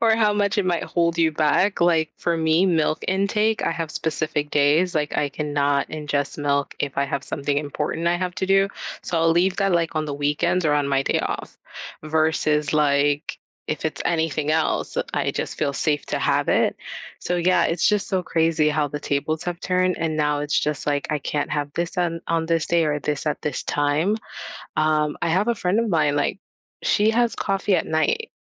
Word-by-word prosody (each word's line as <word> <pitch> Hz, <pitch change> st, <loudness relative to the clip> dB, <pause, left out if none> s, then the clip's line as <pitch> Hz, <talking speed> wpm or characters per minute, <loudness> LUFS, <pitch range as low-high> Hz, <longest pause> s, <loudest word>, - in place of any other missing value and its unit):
Or 225 Hz, -1 st, +4 dB
how 210 Hz, -2 st, +3 dB
much 205 Hz, 0 st, 0 dB
it 195 Hz, -, +2 dB
might 175 Hz, -2 st, 0 dB
hold 170 Hz, -1 st, 0 dB
you 165 Hz, -1 st, +3 dB
back. 155 Hz, +7 st, +1 dB
Like, 165 Hz, -3 st, +3 dB
for 170 Hz, -1 st, 0 dB
me, 160 Hz, +3 st, +3 dB
milk 160 Hz, -3 st, +1 dB
intake, 210 Hz, +3 st, +1 dB
I -, -, +1 dB
have 165 Hz, -1 st, -3 dB
specific 155 Hz, -1 st, -2 dB
days, 150 Hz, +5 st, +3 dB
like, 150 Hz, -1 st, -1 dB
I 145 Hz, -, +1 dB
cannot 145 Hz, -1 st, 0 dB
ingest 145 Hz, -2 st, -3 dB
milk 140 Hz, -1 st, 0 dB
if 140 Hz, -1 st, -2 dB
I 140 Hz, -, +3 dB
have 140 Hz, 0 st, -3 dB
something 140 Hz, 0 st, -2 dB
important 150 Hz, +3 st, -2 dB
I 175 Hz, -, +2 dB
have 180 Hz, 0 st, -3 dB
to 190 Hz, -, -1 dB
do. 195 Hz, 0 st, +4 dB, 0.4 s
So, 170 Hz, -, -3 dB
I'll 165 Hz, 0 st, +3 dB
leave 180 Hz, +3 st, +2 dB
that, 195 Hz, -1 st, +2 dB
like, 165 Hz, -1 st, +1 dB
on 155 Hz, 0 st, 0 dB
the 145 Hz, -, -4 dB
weekends 150 Hz, +5 st, 0 dB
or 150 Hz, -, +3 dB
on 145 Hz, -1 st, +1 dB
my 135 Hz, -1 st, +2 dB
day -, -, 0 dB
off -, -, -5 dB, 0.5 s
versus 155 Hz, -2 st, +1 dB
like, 145 Hz, -1 st, +1 dB, 0.3 s
if 155 Hz, -, -3 dB
it's 160 Hz, -, -2 dB
anything 160 Hz, -3 st, 0 dB
else, 160 Hz, 0 st, 0 dB, 0.2 s
I -, -, 0 dB
just -, -, -4 dB
feel 140 Hz, -, 0 dB
safe 145 Hz, +1 st, 0 dB
to -, -, -2 dB
have -, -, +1 dB
it. -, -, +2 dB, 0.5 s
So, 180 Hz, -, -1 dB
yeah, 180 Hz, +1 st, +3 dB
it's 165 Hz, 0 st, +1 dB
just 210 Hz, -1 st, 0 dB
so 185 Hz, -2 st, 0 dB
crazy 160 Hz, -2 st, +2 dB
how 150 Hz, -1 st, 0 dB
the 145 Hz, -, -5 dB
tables 145 Hz, +2 st, -2 dB
have 175 Hz, 0 st, -4 dB
turned 185 Hz, 0 st, +1 dB
and 160 Hz, -1 st, -1 dB
now 150 Hz, -1 st, +1 dB
it's 145 Hz, 0 st, 0 dB
just, 150 Hz, -2 st, -2 dB
like, 145 Hz, -1 st, -1 dB
I 150 Hz, -1 st, -1 dB
can't 145 Hz, +2 st, -2 dB
have 145 Hz, -1 st, -2 dB
this 170 Hz, +2 st, -2 dB
on 170 Hz, -2 st, -1 dB
on 165 Hz, -1 st, 0 dB
this 165 Hz, -1 st, +1 dB
day 170 Hz, -1 st, +2 dB
or 150 Hz, -1 st, 0 dB
this 145 Hz, 0 st, -3 dB
at 150 Hz, -, -1 dB
this 150 Hz, -4 st, -2 dB
time. 150 Hz, +8 st, +1 dB, 0.6 s
Um, 155 Hz, -1 st, +1 dB
I -, -, 0 dB
have 190 Hz, +7 st, +1 dB
a 235 Hz, -, +2 dB
friend 195 Hz, +2 st, 0 dB
of 230 Hz, -, 0 dB
mine, 150 Hz, -5 st, +2 dB
like, 180 Hz, +6 st, -1 dB, 0.4 s
she 210 Hz, +1 st, +3 dB
has 235 Hz, 0 st, +1 dB
coffee 195 Hz, -1 st, 0 dB
at -, -, 0 dB
night, 455 Hz, -, 0 dB
160 Hz, 210 wpm, -23 LUFS, 150-180 Hz, 0.6 s, Or